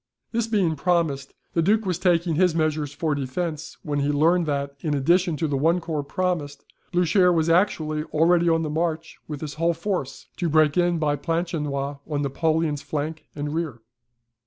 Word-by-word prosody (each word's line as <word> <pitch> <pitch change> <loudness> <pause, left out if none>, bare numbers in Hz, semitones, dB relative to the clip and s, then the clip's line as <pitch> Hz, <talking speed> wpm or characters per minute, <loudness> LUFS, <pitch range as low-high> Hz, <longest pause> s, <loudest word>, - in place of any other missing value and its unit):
This 230 -1 0
being 195 -8 +1
promised, 150 -4 0 0.2
the 165 - +2
Duke 215 +5 +2
was 180 -3 -1
taking 175 -2 +2
his 175 +1 +3
measures 155 -3 0
for 150 +1 -1
defence, 150 +4 -4
when 145 -2 -2
he 140 +1 +1
learned 165 +4 +3
that, 140 -1 -2
in 150 0 -1
addition 170 +4 +2
to 160 - 0
the 145 - -1
one 165 +6 +2
corps 160 -3 -3
promised, 145 -2 -3 0.3
Blucher 180 +1 +4
was 165 -1 +2
actually 155 -4 +1
already 170 +2 +3
on 165 0 +2
the 155 - -2
march 165 0 -2
with 150 -2 -6
his 150 -2 -5
whole 170 0 +2
force, 170 -5 -3
to 175 - -1
break 155 -1 +4
in 175 -1 +2
by 150 -2 0
Planchenoit 145 -3 -2
on 145 -1 -1
Napoleon's 155 +1 0
flank 155 +2 -4
and 145 0 -3
rear. 160 -7 -3
160 Hz, 180 wpm, -24 LUFS, 145-175 Hz, 0.3 s, Blucher